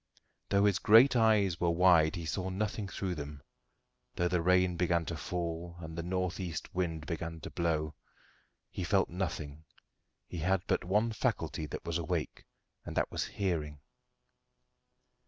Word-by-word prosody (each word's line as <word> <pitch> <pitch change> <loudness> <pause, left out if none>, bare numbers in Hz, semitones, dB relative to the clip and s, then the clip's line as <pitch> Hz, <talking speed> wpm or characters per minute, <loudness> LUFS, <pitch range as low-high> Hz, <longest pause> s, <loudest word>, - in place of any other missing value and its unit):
Though 100 0 +4
his 100 -3 +3
great 115 +6 +7
eyes 105 -6 +3
were 85 - +3
wide 85 -2 +5
he 85 -2 -5
saw 95 +3 -2
nothing 100 +2 -2
through 95 -1 -3
them; 75 -3 -7 0.7
though 90 - +1
the 90 -1 +1
rain 90 0 +3
began 85 -1 +1
to 85 - -4
fall, 85 +1 -4
and 80 -1 -7
the 85 - -3
north 90 +1 -2
east 85 -4 -5
wind 80 -4 -2
to 80 -1 -5
blow, 80 -2 -1 0.8
he - - -4
felt - - +2
nothing: 80 -5 -4 0.6
he 85 - -7
had 90 +3 +1
but - - 0
one 105 +6 +1
faculty 80 -7 -1
that - - -7
was 85 0 -1
awake, 80 - -3 0.4
and - - -7
that - - +1
was - - -1
hearing. 80 -7 -2
85 Hz, 155 wpm, -32 LUFS, 80-95 Hz, 0.8 s, great